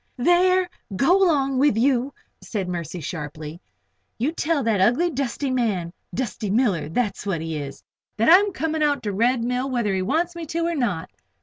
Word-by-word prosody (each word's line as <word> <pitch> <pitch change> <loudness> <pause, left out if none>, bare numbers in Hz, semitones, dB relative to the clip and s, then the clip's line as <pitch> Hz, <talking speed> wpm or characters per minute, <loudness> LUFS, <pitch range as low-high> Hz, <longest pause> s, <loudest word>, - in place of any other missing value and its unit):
"There! 360 +6 +3 0.3
Go 355 - +4
along 275 -7 +2
with 280 -5 +3
you," 255 +2 +2 0.3
said 200 -5 -4
Mercy, 175 -1 -5
sharply. 155 +1 -6 0.6
"You 255 +7 0
tell 325 -3 0
that 220 -4 +1
ugly, 255 - +3
dusty 275 0 -2
man 205 -9 -1 0.2
Dusty 230 -4 -3
Miller, 200 - +1
that's 205 +3 -1
what 195 -5 -2
he 160 0 -4
is 140 -2 -6 0.3
that 225 - +2
I'm 395 +5 +6
coming 320 -3 -2
out 290 -3 +1
to 210 - -2
the - - -5
Red 235 +3 +2
Mill, 250 +2 -1
whether 235 -6 0
he 190 - 0
wants 330 - 0
me 335 -2 -6
to 335 +2 -1
or 340 - 0
not." 235 - -2
245 Hz, 185 wpm, -23 LUFS, 190-305 Hz, 0.6 s, I'm